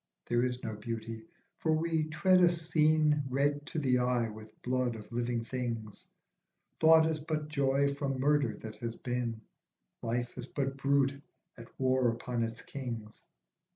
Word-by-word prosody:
There 120 0 +2
is 125 0 -1
no 110 -2 -3
beauty, 115 +4 -6 0.3
for 160 - +2
we 160 0 +1
tread 180 +4 +3
a 175 - +7
scene 155 -3 +3
Red 145 +2 0
to 165 - -5
the 130 -4 +2
eye 125 -2 +1
with 110 0 -12
blood 125 -1 0
of 110 0 -10
living 120 0 -1
things; 115 -4 -4 0.7
Thought 160 0 +7
is 160 -1 0
but 150 0 -3
joy 140 -1 +2
from 140 -2 -2
murder 140 -5 +2
that 110 -1 -7
has 115 -1 -4
been, 120 -3 -3 0.6
Life 120 +2 -2
is 125 - -5
but 135 -1 -2
brute 140 0 +1 0.3
at 115 -1 -11
war 130 -1 +3
upon 120 +1 -2
its 115 +1 -3
kings. 115 -6 -6
130 Hz, 155 wpm, -32 LUFS, 115-150 Hz, 0.7 s, a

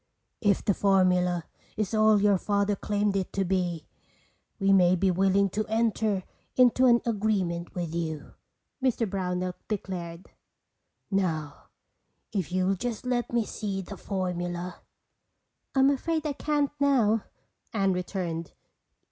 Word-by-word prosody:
"If 205 -3 +2
the 205 - +3
formula 180 -3 +2 0.3
is 215 0 -1
all 215 -1 +5
your 200 -2 +4
Father 200 +1 +1
claimed 205 0 0
it 190 -2 -1
to 195 -1 0
be, 175 -4 -1 0.7
we 195 -1 +3
may 180 -1 +5
be 185 +1 +2
willing 195 +2 +3
to 215 - -1
enter 220 -3 +1 0.3
into 255 0 +5
an 235 -1 +5
agreement 195 -6 -1
with 170 -3 -3
you," 160 -3 -4 0.5
Mr 245 -3 +1
Brownell 180 -2 -2
declared. 180 -4 -5 0.8
"Now 160 -7 -1 0.7
if 190 -7 -2
you'll 185 +1 +2
just 230 +4 -4
let 245 -1 -1
me 235 -2 +1
see 195 -3 -4
the 200 - -8
formula—" 180 -2 -3 1.0
"I'm 270 +1 +5
afraid 315 +3 -1
I 300 - 0
can't 290 0 0
now," 235 -7 +3 0.5
Anne 195 -3 +1
returned. 175 -3 -4
195 Hz, 130 wpm, -27 LUFS, 180-220 Hz, 1.0 s, all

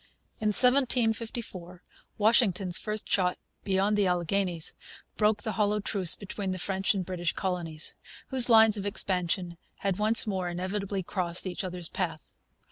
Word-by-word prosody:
In 215 - -2
1754 225 -6 +1 0.3
Washington's 200 -5 +2
first 215 -1 -4
shot 180 -2 0 0.3
beyond 195 +2 0
the 205 -2 +1
Alleghanies 180 -1 +1 0.4
broke 210 -1 +1
the 220 - -2
hollow 210 +1 0
truce 195 -4 +3
between 200 -1 -6
the 185 - -3
French 190 +3 -1
and 190 -2 -3
British 175 -3 -2
colonies, 170 -4 -3 0.3
whose 255 -2 +6
lines 220 -2 +5
of 200 - -5
expansion 180 -3 -1 0.2
had 195 -1 -2
once 215 +2 +4
more 190 -4 -3
inevitably 190 +2 -4
crossed 175 -1 -1
each 185 +2 -4
other's 180 -2 -5
path. 165 -4 -5
195 Hz, 140 wpm, -27 LUFS, 180-210 Hz, 0.4 s, whose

